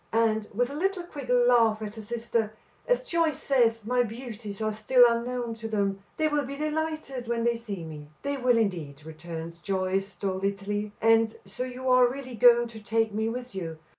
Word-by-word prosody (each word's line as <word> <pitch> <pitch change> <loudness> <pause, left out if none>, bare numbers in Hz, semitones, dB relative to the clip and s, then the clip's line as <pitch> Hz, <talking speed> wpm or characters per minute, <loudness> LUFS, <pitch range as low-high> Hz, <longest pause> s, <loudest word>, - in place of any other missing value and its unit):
And," 220 -1 +2
with 245 +5 0
a - - -6
little, 375 +3 0
quick 285 -7 -9
laugh 240 -3 +4
at 210 -1 -5
her 220 - -8
sister, 225 0 -2 0.3
"as - - +3
Joyce 335 - +1
says, 230 -5 +2
my 250 +2 +2
beauties 225 -3 -6
are 215 0 0
still 245 +4 +5
unknown 235 0 -1
to 225 0 -6
them; 200 -3 0 0.2
they 315 - +2
will 295 -1 +1
be 280 +1 -6
delighted 305 -4 -3
when 235 -1 0
they 235 0 +2
see 210 -6 -6
me." 150 -2 -8 0.2
"They 280 0 -1
will, 250 -2 +3
indeed," 160 -9 -2
returns 165 +1 -7
Joyce 190 +1 -1
stolidly. 200 +1 -2
"And 225 0 +4
so 240 +6 -5
you 255 +1 -6
are 255 -1 +6
really 260 -1 -7
going 240 +1 +6
to 225 -1 -10
take 225 0 0
me 220 +1 0
with 250 +1 -6
you. 165 -4 -5
230 Hz, 190 wpm, -27 LUFS, 205-250 Hz, 0.3 s, are